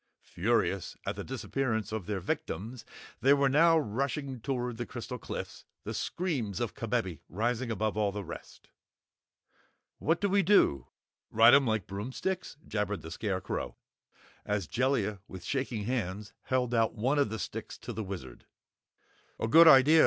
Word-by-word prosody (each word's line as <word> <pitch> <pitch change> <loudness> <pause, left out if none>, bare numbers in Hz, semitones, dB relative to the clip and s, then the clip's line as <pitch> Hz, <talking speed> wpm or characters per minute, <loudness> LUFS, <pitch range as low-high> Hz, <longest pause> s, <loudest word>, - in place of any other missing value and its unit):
Furious 100 -2 0
at - - -2
the - - -5
disappearance 120 -4 -2
of 110 -5 -4
their 105 -2 -1
victims, 110 +7 -4 0.3
they 140 +2 +5
now 145 +4 +5
were 155 - +2
rushing 135 +3 -2
toward 125 -1 -2
the 120 - -3
crystal 125 +1 -6
cliffs, - - -6 0.2
the - - -4
screams 135 - -2
of - - -2
Kabebe - - -2
rising 120 +6 -1
above 110 -1 -1
all 105 -2 +1
the 100 0 -5
rest. 85 -1 -10 1.3
"What 165 +3 +1
do 205 - +1
we 200 +1 +3
do 195 - +4 0.4
ride 115 +2 +7
'em 140 -2 +6
like 110 -4 0
broomsticks?" 130 - -4
jabbered 105 -1 -2
the 80 - -8
Scarecrow, 95 0 -3 0.7
as 105 -3 -1
Jellia 120 - 0
with 95 -2 -9
shaking 130 -6 -2
hands 105 -3 -3
held 125 -2 0
out 115 -1 +2
one 130 +7 +1
of 140 - +3
the 110 - -3
sticks - - -6
to - - -7
the 110 - -3
Wizard. 90 -11 -8 0.9
"A - - 0
good 165 +8 +8
idea!" 150 +2 +8
115 Hz, 155 wpm, -30 LUFS, 105-135 Hz, 1.3 s, good